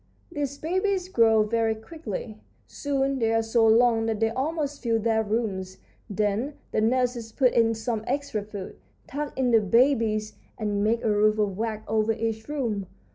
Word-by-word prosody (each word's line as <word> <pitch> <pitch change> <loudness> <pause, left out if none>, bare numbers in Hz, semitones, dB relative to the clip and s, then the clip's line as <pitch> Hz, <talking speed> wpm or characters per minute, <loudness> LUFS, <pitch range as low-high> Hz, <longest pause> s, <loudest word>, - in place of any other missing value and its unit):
"These 285 -3 -3
babies 370 +3 -1
grow 225 - +4
very 225 +1 0
quickly. 220 - -7 0.3
Soon 275 -1 -1
they 225 -1 +1
are 225 0 +2
so 225 0 +3
long 225 0 +4
that 220 -2 -1
they 225 0 +2
almost 290 +2 -2
fill 230 -2 +1
their 220 0 +1
rooms. 200 -4 -2 0.3
Then 210 +7 -1 0.2
the - - +1
nurses 240 0 0
put 255 +1 +2
in 225 -1 +3
some 220 0 -3
extra 275 -5 -2
food, 205 -2 -8 0.3
tuck 290 +1 -5
in 255 -2 +2
the 225 -1 +5
babies, 220 -1 +2 0.2
and 205 -2 -1
make 230 +2 +1
a 220 - +2
roof 210 +1 +3
of 205 -3 0
wax 220 +1 -3
over 220 0 +1
each 220 +2 -3
room. 230 -10 -2
225 Hz, 170 wpm, -26 LUFS, 215-260 Hz, 0.3 s, the